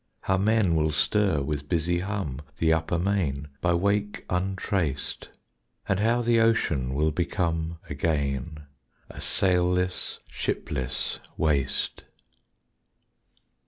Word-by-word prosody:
How 95 - +1
men 100 -2 +3
will 80 -1 +2
stir 95 -2 +2
with 75 0 -3
busy 85 0 +1
hum 90 -8 -3 0.2
The 80 -1 +3
upper 80 +2 0
main, 85 -7 0
by 85 -1 +3
wake 100 +3 0
untraced, 90 -5 -1 0.6
And 95 - +1
how 115 +3 +2
the 120 0 +4
ocean 75 - +2
will 75 +2 +2
become 85 0 -1
Again 70 0 -1 0.5
a - - -9
sailless, 90 -1 +1
shipless 65 -1 -3 0.2
waste. 75 -4 0
85 Hz, 105 wpm, -27 LUFS, 75-95 Hz, 0.6 s, the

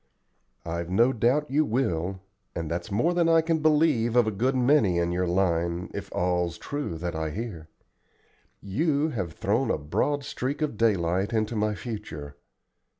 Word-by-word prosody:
"I've 85 0 -3
no 115 +8 +3
doubt 130 +6 +1
you 150 +3 +3
will, 95 - -1 0.3
and 80 -1 -4
that's 85 +4 -3
more 120 - +1
than 170 -1 +2
I 165 0 +5
can 160 0 0
believe 150 -7 +3
of 120 -2 +5
a 110 - 0
good 125 +7 0
many 125 -8 +3
in 85 0 +1
your 90 +1 0
line, 85 -1 0
if - - -6
all's 90 -1 0
true 145 - -4
that 85 +1 -4
I 80 0 -2
hear. 90 -4 -6 0.9
You 145 - +1
have 90 - -4
thrown - - 0
a - - +1
broad 140 - -1
streak 140 +3 -3
of 150 -7 -2
daylight 100 -2 +1
into 110 +1 0
my 105 0 0
future. 80 - -7
105 Hz, 165 wpm, -26 LUFS, 85-135 Hz, 0.9 s, I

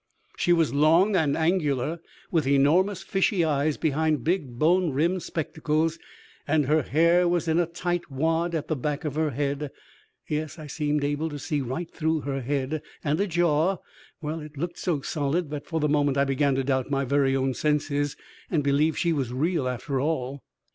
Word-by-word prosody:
She 175 - +1
was 165 -4 +3
long 165 +8 +4
and 150 -5 +2
angular, 160 -3 0 0.3
with 160 -6 +1
enormous 165 +8 +3
fishy 195 -2 +1
eyes 150 0 +1
behind 155 -2 +1
big 155 -8 -1
bone 175 +5 +3
rimmed 170 +7 +1
spectacles, 160 0 -1 0.5
and 150 -1 +2
her 155 +3 +3
hair 170 +6 +3 0.2
in 165 +1 +2
a 175 - +2
tight 175 0 -3
wad 165 +5 0
at 155 - -3
the 155 - 0
back 150 +3 -3
of 150 - -2
her 155 +1 +1
head 140 +2 -2 0.6
(yes, 155 0 -3
I 155 - -8
seemed 150 0 -1
able 145 +3 -1
to 145 - -6
see 145 0 -2
right 135 +7 -4
through 160 -1 0
her 135 -1 -3
head) 140 +3 -2 0.2
and 150 +1 0
a 200 - +1
jaw 175 +1 +2 0.5
well, 155 +2 -3
it 150 -1 -10
looked 170 +4 -4
so 165 -6 -1
solid 150 +2 -1
that 150 -1 -5
for 165 -3 -1
the 150 - +1
moment 145 -2 +2
I 140 - +4
began 135 0 +1
to 135 - 0
doubt 130 -1 0
my 140 -1 0
very 135 0 +2
own 135 0 +1
senses 145 0 0 0.3
and 155 -4 +1
believe 145 +3 +2
she 170 -1 +1
was 135 -5 -2
real 150 +2 0
after 125 +2 -2
all. 140 -2 -2
150 Hz, 185 wpm, -26 LUFS, 140-165 Hz, 0.6 s, long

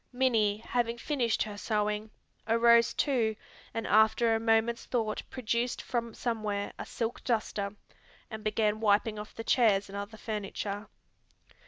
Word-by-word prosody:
Minnie, 230 -5 +2
having 235 +1 -1
finished 240 -4 0
her 205 -1 -7
sewing, 210 0 -1 0.4
arose 235 +1 +5
too 235 -7 +1 0.4
and 225 0 -3
after 220 +2 +4
a 225 - +2
moment's 225 +1 +2
thought 220 -4 -1
produced 235 0 -1
from 235 -2 -3
somewhere 215 -4 -2
a - - -5
silk 230 0 -3
duster, 210 -4 -1 0.6
and 220 -1 -6
began 215 0 +1
wiping 210 0 +2
off 210 - -9
the 225 - -5
chairs 210 -5 +3
and 195 - -8
other 205 +2 -6
furniture. 205 -1 -4
220 Hz, 140 wpm, -30 LUFS, 210-235 Hz, 0.6 s, arose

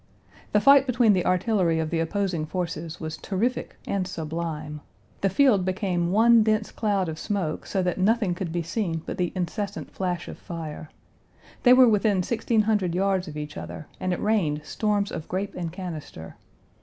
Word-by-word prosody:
The 210 - +4
fight 275 +3 +6
between 240 -4 +4
the 180 -2 +1
artillery 185 -3 +2
of 160 -1 -2
the 165 - 0
opposing 170 -2 -1
forces 170 -2 -4
was 160 -1 -5
terrific 230 +6 -2
and 195 -2 -1
sublime. 155 -3 -4 0.4
The 195 - +3
field 210 -2 +4
became 185 -2 -1
one 230 +3 +6
dense 215 0 +1
cloud 200 -4 0
of 160 -1 -5
smoke, 185 -7 -2
so 190 -2 0
that 180 +1 -1
nothing 205 -1 +2
could 175 -1 -4
be 170 0 -1
seen, 170 -2 -2
but - - -5
the 175 -1 0
incessant 200 +3 -3
flash 180 -2 -3
of - - -8
fire. 155 -2 -7 0.7
They 250 - +7
were 255 0 +7
within 205 -3 +3
sixteen 225 +1 +1
hundred 205 -5 +1
yards 190 -1 +1
of 150 -1 -7
each 150 0 -6
other 155 - -7
and 185 - -1
it 180 - -1
rained 175 -9 +1
storms 205 -2 0
of 155 - -6
grape 195 +2 -3
and 170 -2 -4
canister. 160 - -7
185 Hz, 180 wpm, -25 LUFS, 165-210 Hz, 0.7 s, They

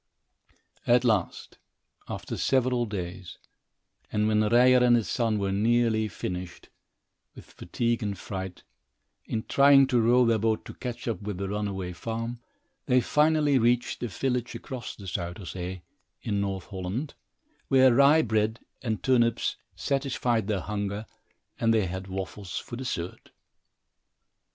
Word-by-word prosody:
At 120 0 +5
last, 110 -7 -1 0.5
after - - -5
several 125 -2 +1
days, 90 -3 -6 0.7
and 105 0 +1
when 110 0 +3
Ryer 125 +4 +5
and 120 -1 +6
his 115 -3 0
son 115 -3 0
were 100 -1 -1
nearly 110 +1 +2
finished, 90 -2 -6 0.7
with - - -12
fatigue 120 0 -2
and 100 -2 -3
fright, 95 0 -6 0.6
in 110 - -3
trying 140 0 +6
to 125 -3 +2
row 120 +2 +4
their 115 -1 +2
boat 110 0 0
to - - -8
catch 120 -1 -6
up 115 -2 -2
with 105 -2 -4
the 100 +1 -3
runaway 100 -3 -3
farm, 115 +5 -4 0.5
they 125 - +4
finally 150 0 +3
reached 120 +1 +1
a 120 - -1
village 125 +4 -2
across 130 -3 -7
the 100 - -11
Zuyder 90 0 -4
Zee, 90 0 -6 0.4
in 100 -2 -1
North 95 -2 -3
Holland, 100 +9 -4 0.5
where 130 -2 +5
rye 140 +5 +6
bread 110 0 0 0.2
and 110 -7 -3
turnips 120 -3 +2 0.2
satisfied 125 -5 0
their 105 -4 0
hunger 105 0 -3 0.5
and 115 - +3
they 110 -3 +3
had 95 +1 -5
waffles 95 0 -5
for 120 - -6
dessert. 120 -9 -5
110 Hz, 140 wpm, -27 LUFS, 100-125 Hz, 0.7 s, and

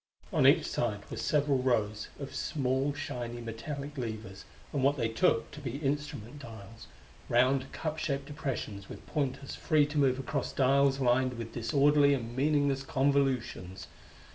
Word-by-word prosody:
On - - +5
each - - +5
side 105 -4 -1
were - - -4
several 145 -2 +2
rows 110 -4 0
of 140 -1 -6
small, 135 -1 0
shiny, 125 -5 -5
metallic 140 +6 -6
levers 110 -5 -6 0.3
and 140 - 0
what 140 +2 +3
they 115 -3 +1
took 115 0 +2
to 150 - -9
be 130 -3 -5
instrument 145 -3 -3
dials 115 -3 -11 0.4
round, 130 +2 +3
cup 155 -1 -3
shaped 140 -2 -2
depressions 125 -9 -5
with - - -10
pointers 135 -2 -2
free 155 -3 +3
to 150 +1 -2
move 130 -2 +3
across 135 +2 -3
dials 140 +1 +3
lined 130 0 +2
with 115 -1 -6
disorderly 140 +5 +4
and 120 -2 -5
meaningless 145 -1 +2
convolutions. 135 -9 0
135 Hz, 150 wpm, -31 LUFS, 120-145 Hz, 0.4 s, On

